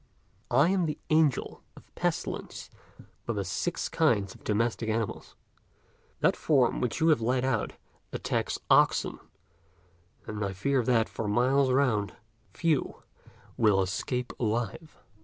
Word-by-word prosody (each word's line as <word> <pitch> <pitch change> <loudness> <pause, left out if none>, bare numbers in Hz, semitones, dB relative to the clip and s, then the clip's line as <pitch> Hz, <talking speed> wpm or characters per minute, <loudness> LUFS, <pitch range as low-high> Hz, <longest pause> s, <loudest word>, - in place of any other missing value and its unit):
I 140 +7 +4
am 185 -3 +1
the 150 - -3
Angel 155 -4 +2 0.2
of - - -17
Pestilence - - -3 0.5
for 115 - -2
the 100 -2 -2
six 90 -1 -2
kinds 100 -1 +1
of - - -18
domestic 115 +1 0
animals. 110 -1 -3 0.9
That - - +3
form 135 -6 +2
which 125 +3 -1
you 160 +1 +3
have 150 -7 +4
let 125 +3 +1
out 125 -5 -1 0.4
attacks - - -2
oxen, - - +3 1.1
and 105 -1 -4
I 100 -1 -2
fear 130 +8 +1
that, 115 -2 +2
for 110 - -5
miles 130 +5 +3
round, 125 -7 +1 0.4
few 155 - -1 0.5
will 105 -4 +4
escape 110 +6 -2
alive." 120 - -2
120 Hz, 130 wpm, -28 LUFS, 105-140 Hz, 1.1 s, I